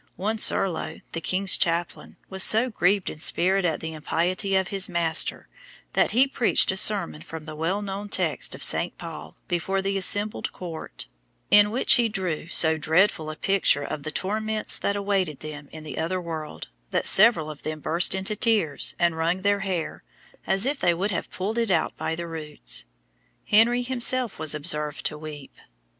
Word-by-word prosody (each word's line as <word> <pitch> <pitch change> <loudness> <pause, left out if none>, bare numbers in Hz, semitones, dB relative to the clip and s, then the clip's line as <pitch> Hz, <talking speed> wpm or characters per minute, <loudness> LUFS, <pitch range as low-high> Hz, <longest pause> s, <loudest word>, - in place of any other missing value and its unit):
One 215 +4 -2
Serlo, 190 -5 0
the 165 - -5
king's 185 +3 +1
chaplain, 170 0 -2
was 190 0 -2
so 225 +6 +5
grieved 195 -1 +1
in 155 - -4
spirit 185 +3 +2
at 160 -3 -1
the 160 0 -6
impiety 180 +5 -1
of 190 -1 0
his 195 -1 +1
master, 170 -2 +1 0.5
that - - +2
he 255 +4 +4
preached 250 -8 +1
a - - -4
sermon 190 -6 +3
from 160 -2 -9
the 155 -1 -8
well 175 +7 -2
known 200 +1 -6
text - - 0
of - - -7
St. - - +1
Paul - - -10
before 190 +2 -2
the 195 0 -1
assembled 205 +3 +1
court, 170 -3 -8 0.5
in 205 0 +6
which 235 +5 +3
he 235 -2 +1
drew 185 -7 -3
so 160 -2 +4
dreadful 160 +1 +1
a 155 - -6
picture 185 -5 +1
of 145 - -5
the 155 - -6
torments 215 +6 0
that 200 - -1
awaited 195 -7 -2
them 150 -2 -9
in 155 -1 -10
the 155 - -7
other 185 +3 -2
world, 160 -3 -7 0.2
that - - -1
several 205 -7 +5
of 150 - -12
them 155 0 -5
burst 170 +5 +2
into 190 +3 -2
tears, 210 - +2
and 170 -2 0
wrung 170 +3 -1
their 200 0 +2
hair, 185 -5 -4 0.5
as 195 +3 +1
if 275 +1 -1
they 175 -1 +2
would 195 +5 -2
have 175 - -4
pulled 210 +5 -3
it 230 -2 -1
out 170 -4 0
by 160 - -3
the 170 +1 -6
roots. 155 - -3 0.6
Henry 235 +3 +3
himself 250 -3 +1
was 155 -1 +1
observed 150 -1 -1
to 150 - -1
weep. 150 -2 -10
185 Hz, 180 wpm, -24 LUFS, 160-205 Hz, 0.6 s, in